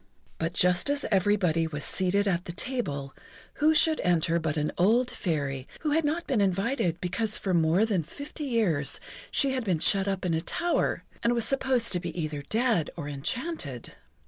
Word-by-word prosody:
But 165 +1 -2
just 180 +5 +2
as 285 0 0
everybody 185 -5 +2
was 150 -2 -5
seated 195 +2 +1
at 180 -2 0
the - - -5
table, 170 - -3 0.4
who 310 +1 +3
should 315 0 +4
enter 170 -1 +2
but 160 -1 -2
an 150 0 0
old 235 +7 +3
Fairy, 140 - -3
who 305 - -1
had 320 +2 +2
not 315 +3 -1
been 245 -6 +1
invited 195 - 0
because 210 +5 0
for 190 - -2
more 170 +5 +3
than 200 -6 0
fifty 285 - -7
years 200 - +1 0.3
she 275 -2 +2
had 260 -2 -1
been 185 -6 +1
shut 195 +4 +3
up 195 -1 -2
in 175 - 0
a 160 - 0
tower, 345 - 0 0.2
and 235 +1 +2
was 235 -2 +1
supposed 260 -2 +2
to 180 - +1
be 175 0 -6
either 155 -3 -3
dead 220 - 0
or 150 -4 -6
enchanted. 145 - -4
190 Hz, 185 wpm, -27 LUFS, 165-245 Hz, 0.4 s, should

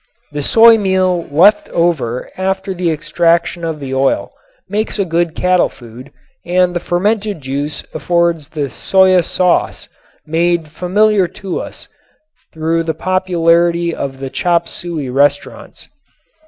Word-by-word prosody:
The 145 0 -4
soy 225 +8 +6
meal 185 -3 0
left 185 +9 +4
after 175 - -2
the 180 -1 -1
extraction 170 +2 0
of 160 -2 -3
the 135 -2 -6
oil 135 0 0 0.4
makes 210 +4 -3
a 200 - 0
good 170 -1 -1
cattle 180 0 +2
food 120 +3 -13 0.3
and 180 0 +1
the - - 0
fermented 205 +3 -1
juice 140 +3 -4
affords 170 0 0
the 145 -4 -4
shoya 185 - +3
sauce 180 +1 0 0.4
made 165 0 0
familiar 195 +4 +1 0.2
to 185 - -2
us - - -8 0.6
through 160 +1 -1
the 160 -1 -3
popularity 170 -2 +1
of 135 -3 -5
the 135 -1 -6
chop 170 +3 0
suey 165 -5 -5
restaurants. 140 +2 -1
170 Hz, 125 wpm, -15 LUFS, 150-185 Hz, 0.6 s, soy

